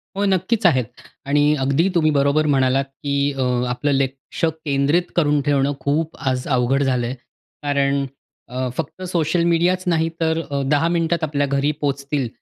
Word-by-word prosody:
हो, 200 +1 0
नक्कीच 195 +3 +1
आहेत 130 -8 +4 0.4
आणि 145 +1 +3
अगदी 140 +6 +2
तुम्ही 155 -2 +3
बरोबर 140 +1 +2
म्हणालात 135 -1 +2
की 140 +1 -5 0.2
अ, - - -1 0.3
आपलं 135 +4 -1
लक्ष 135 +3 -2
केंद्रित 155 +1 0
करून 150 -3 +2
ठेवणं 140 0 +2
खूप 155 +3 -1
आज 130 -1 -2
अवघड 130 +1 +2
झालं 125 -3 0
आहे. 125 - -4 0.5
कारण 140 -1 +1 0.4
अ, 130 +1 -3
फक्त 165 +3 -5
सोशल 170 0 +1
मीडियाच 170 +2 +2
नाही 165 -2 +2
तर 160 0 +1
अ, 140 0 0
10 150 +3 +3
मिनिटांत 170 0 0
आपल्या 145 -2 0
घरी 140 +2 +1
पोहोचतील 140 -1 -1
145 Hz, 160 wpm, -21 LUFS, 140-165 Hz, 0.5 s, आहेत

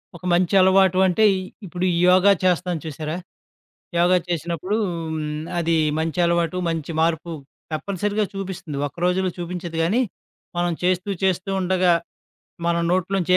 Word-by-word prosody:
ఒక 175 - -11
మంచి 175 +1 +2
అలవాటు 190 0 +4
అంటే 200 +5 +2 0.4
ఇప్పుడు 180 0 -3 0.2
యోగా 185 +2 +6
చేస్తాం 180 0 +1
చూసారా? 155 +1 -4 0.8
యోగా 180 +1 +4
చేసినప్పుడు 170 +3 -2
హ్మ్, 160 -2 -4 0.2
అది 165 0 +1 0.2
మంచి 165 +2 -2
అలవాటు, 170 0 +1
మంచి 165 -1 -3
మార్పు 165 +1 0 0.4
తప్పనిసరిగా 200 +6 -1
చూపిస్తుంది. 190 -6 -5
ఒక్క 145 - -17
రోజుల్లో 185 0 +1
చూపించదు 175 -1 -5
గానీ, 210 +10 +2 0.6
మనం 175 -1 +1
చేస్తూ 185 +2 +1
చేస్తూ 190 +1 +1
ఉండగా. 185 -1 +3 0.7
మనం 170 0 +1
నోట్లో 185 +1 0
నుంచి 180 0 0
175 Hz, 130 wpm, -22 LUFS, 165-185 Hz, 0.8 s, యోగా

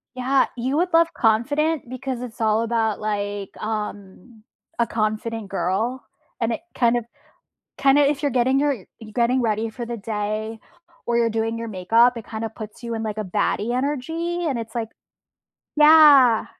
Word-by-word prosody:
Yeah. 260 +2 +2
You 260 +4 -1
would 355 +2 +1
love 330 0 +4
Confident 280 +6 +1
because 255 -1 -5
it's 240 -1 -8
all 220 0 +2
about, 225 -2 0
like, 205 -2 -3
um, 215 0 -6 0.3
a 235 - +2
confident 215 -1 -2
girl, 215 +7 -2 0.4
and 230 0 +1
it - - -5
kinda 240 -1 +2 0.8
kinda 275 +1 +5
if 290 0 0
you're 285 - +1
getting 260 +1 +2
your 290 -1 +2 0.2
you're 215 -2 -12
getting 245 +2 +2
ready 220 -1 -1
for 240 +1 -7
the 235 0 -4
day, 215 +1 -4 0.5
or 235 - +1
you're 230 -1 +2
doing 225 +1 -2
your 230 0 -5
makeup, 225 +6 +3
it 230 - -7
kinda 220 0 -4
puts 220 +1 -10
you 235 -1 -4
in 225 - -3
like 215 -1 -4
a 215 - -2
baddie 210 +5 -1
energy. 325 +6 -2
And 270 -5 -1
it's, 225 0 -7
like 225 -2 -2 0.9
yeah. 300 -6 +7
230 Hz, 165 wpm, -22 LUFS, 215-260 Hz, 0.9 s, yeah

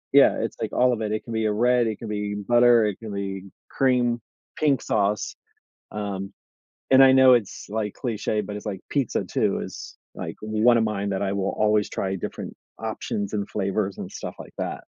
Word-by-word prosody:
yeah, - - +7
it's - - -3
like - - -2
all 125 0 +3
of 115 - -3
it 105 -1 -2
it 110 - -2
can 115 - -7
be 110 -1 0
a 105 - +2
red, 120 +2 +3
it 110 - -2
can 115 - -8
be 105 -1 -3
butter, 120 -2 +6
it 105 -3 -2
can 110 -2 -7
be 100 -1 -4 0.2
cream, 125 -3 +2 0.3
pink 145 -4 +2
sauce, 105 -1 0 0.6
um, 100 -2 -4 0.6
and 135 0 +8
I 130 0 +8
know 130 -1 +7
it's, 115 -5 +1
like, 105 -2 -2
cliché, 110 -3 -1
but 105 - -6
it's, 105 - -9
like, 100 -3 -4
pizza, 140 -4 0
too, - - 0
is, - - -9 0.2
like, - - -6
one 110 +3 +3
of 115 - +3
mine 100 -2 -2
that 95 0 -1
I 100 -1 0
will 100 -1 -1
always 105 -1 +3
try 95 0 -2
different 90 - -6 0.2
options, 100 0 -3
and 100 -1 -2
flavors, 100 -1 -1
and - - -7
stuff - - -6
like - - -10
that. - - -3
105 Hz, 205 wpm, -24 LUFS, 100-120 Hz, 0.6 s, and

